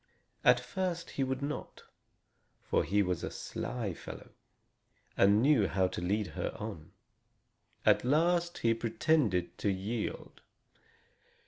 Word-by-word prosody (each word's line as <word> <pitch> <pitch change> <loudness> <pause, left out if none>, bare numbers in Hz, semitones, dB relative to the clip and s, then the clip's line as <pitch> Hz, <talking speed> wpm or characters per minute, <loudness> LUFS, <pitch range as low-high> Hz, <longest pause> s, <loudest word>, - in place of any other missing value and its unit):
At - - +6
first 180 -3 -3
he 135 - -1
would 130 +1 -2
not, 145 +1 -5 0.8
for - - +1
he 100 +5 +2
was 90 -2 -2
a - - -2
sly 115 -7 -4
fellow, - - -10 0.8
and 100 +3 +5
knew 135 -8 +4
how 95 0 +1
to 90 - -5
lead 100 +2 0
her - - -4
on. 100 -8 -7 0.9
At - - +5
last, 170 +6 +2
he 115 0 +2
pretended 115 - +1
to 105 - +1
yield. 100 +4 -4
110 Hz, 125 wpm, -32 LUFS, 95-145 Hz, 0.9 s, At